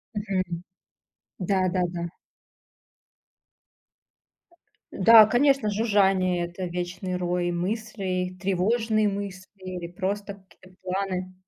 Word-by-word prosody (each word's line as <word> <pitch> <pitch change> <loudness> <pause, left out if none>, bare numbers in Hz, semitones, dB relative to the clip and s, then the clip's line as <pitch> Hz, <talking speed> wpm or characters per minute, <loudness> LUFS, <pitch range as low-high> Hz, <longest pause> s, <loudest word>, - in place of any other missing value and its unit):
Мгм. 185 -4 -2 0.8
Да 185 0 +1
да 180 -1 +1
да. 170 0 -4 2.8
Н-да, 220 +3 +8
конечно, 270 -2 +3
жужжание- 195 -4 +2
это 175 +2 -6
вечный 180 +1 -4
рой 175 0 -1
мыслей, 185 -1 -3
тревожные 215 +3 +1
мысли 195 -2 -4 0.2
или 180 -2 -6
просто 200 +3 -3
какие-то 185 0 -20
планы. 185 0 -3
185 Hz, 90 wpm, -26 LUFS, 180-205 Hz, 2.8 s, Н-да